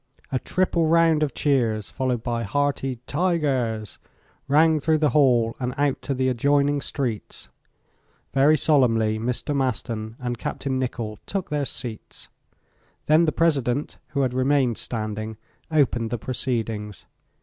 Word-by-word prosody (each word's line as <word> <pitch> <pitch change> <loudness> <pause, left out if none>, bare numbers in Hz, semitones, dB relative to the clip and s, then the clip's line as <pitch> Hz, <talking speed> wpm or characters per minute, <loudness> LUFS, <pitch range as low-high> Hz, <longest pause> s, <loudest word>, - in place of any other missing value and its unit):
A 130 - 0
triple 175 -1 +1
round 165 -1 +4
of 150 -2 0
cheers, 115 -8 +1
followed 125 -4 -1
by 120 -1 -1
hearty 135 +2 -1
"tigers," 135 - -1 0.5
rang 155 +2 +4
through 155 +2 +2
the 150 -3 +2
hall 120 -5 +3
and 125 0 -3
out 145 -1 +1
to 140 - -2
the 130 0 +1
adjoining 140 +3 +2
streets. 125 -7 -4 0.8
Very 145 +3 +5
solemnly 115 -8 +2
Mr. 125 +5 -2
Maston 115 -4 -2
and 120 -2 -4
Capt. - - -5
Nicholl 125 -5 -2
took 195 -5 -3
their 145 -1 0
seats. 120 -5 -8 0.8
Then 155 +2 +5
the 155 - +2
President, 145 -5 0
who 145 -2 -1
had 125 -2 0
remained 130 -2 +2
standing, 110 -1 -4 0.3
opened 125 -7 +2
the 120 - -2
proceedings. 115 -4 -3
130 Hz, 135 wpm, -24 LUFS, 115-145 Hz, 0.8 s, Very